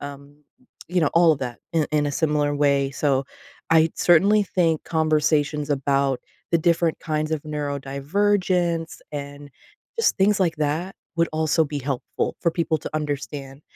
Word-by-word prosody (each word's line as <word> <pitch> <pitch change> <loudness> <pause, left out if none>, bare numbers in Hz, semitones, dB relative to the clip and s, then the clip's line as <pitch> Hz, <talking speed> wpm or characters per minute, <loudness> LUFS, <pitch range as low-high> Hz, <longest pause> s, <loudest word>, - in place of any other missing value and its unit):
um, 140 0 -9 0.5
you 180 +1 +1
know, 155 - +2
all 170 -1 +6
of 150 - -3
that, 125 -3 -5
in 160 -2 +1
in 150 -1 +2
a 145 - -2
similar 150 -1 +1
way. 140 -1 +2
So, 140 -1 0 0.5
I 160 0 +5
certainly 200 +5 +4
think 165 -5 0
conversations 150 -2 +1
about 140 -1 +1 0.3
the 170 - +3
different 165 0 +1
kinds 155 0 -2
of 155 -2 -1
neurodivergence 165 +5 -1
and 145 0 -7 0.5
just 460 - +2
things 195 0 +3
like 170 -3 +1
that 155 +6 -2 0.2
would 170 0 +2
also 160 +1 +2
be 145 0 -4
helpful 135 -1 -3
for 170 - +2
people 165 -1 0
to - - -7
understand, 145 -2 -4
150 Hz, 155 wpm, -23 LUFS, 145-165 Hz, 0.5 s, all